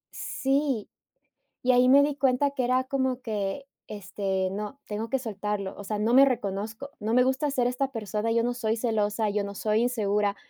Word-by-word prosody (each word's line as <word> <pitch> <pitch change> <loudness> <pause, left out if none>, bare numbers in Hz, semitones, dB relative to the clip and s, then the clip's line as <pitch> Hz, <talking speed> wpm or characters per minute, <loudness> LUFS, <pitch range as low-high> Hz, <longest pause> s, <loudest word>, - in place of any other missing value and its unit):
sí, 270 -4 -1 0.8
y 255 - +4
ahí 250 0 +5
me 280 +2 +7
di 295 -1 0
cuenta 275 0 +2
que 260 - -2
era 255 +1 +2
como 260 -1 -1
que, 215 +2 -3 0.2
este 190 -2 -2
"No, 210 +7 -5
tengo 215 +2 -4
que 270 - 0
soltarlo, 210 -4 -4
o 205 - -8
sea, 210 +1 -3
no 220 +3 +1
me 275 +1 +9
reconozco, 220 +2 -3
no 220 +2 -1
me 250 0 +5
gusta 265 +3 0
ser 255 -3 +1
esta 260 +2 -1
persona, 215 -1 -3
yo 230 0 +2
no 245 - 0
soy 225 -2 -1
celosa, 215 -2 0
yo 205 0 0
no 200 0 -6
soy 215 +1 +1
insegura, 210 -4 0
225 Hz, 195 wpm, -27 LUFS, 210-260 Hz, 0.8 s, me